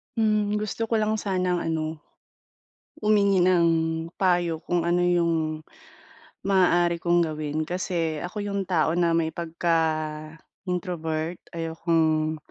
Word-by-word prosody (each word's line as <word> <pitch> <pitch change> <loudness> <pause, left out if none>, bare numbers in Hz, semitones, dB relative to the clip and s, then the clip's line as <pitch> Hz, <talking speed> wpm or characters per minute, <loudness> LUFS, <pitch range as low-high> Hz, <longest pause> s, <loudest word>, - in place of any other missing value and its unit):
Mm, 215 -2 +1
gusto 215 +2 -2
ko 230 - 0
lang 215 0 +1
sanang 185 -3 0
ano, 160 -1 -2 1.0
humingi 200 -3 +3
ng 175 -2 +4 0.5
payo 175 -3 +2
kung 175 -2 -1
ano 175 +1 +2
yung 165 -3 +1 0.8
maaari 175 -3 +3
kong 175 0 +3
gawin? 155 0 -3
Kasi 170 -4 -2
ako 180 +4 -5
yung 200 -1 -2
tao 170 -3 +1
na 170 -1 +2
may 165 -1 0
pagka-introvert. 160 +1 -3
Ayokong 160 -1 0
170 Hz, 110 wpm, -25 LUFS, 160-185 Hz, 1.0 s, ng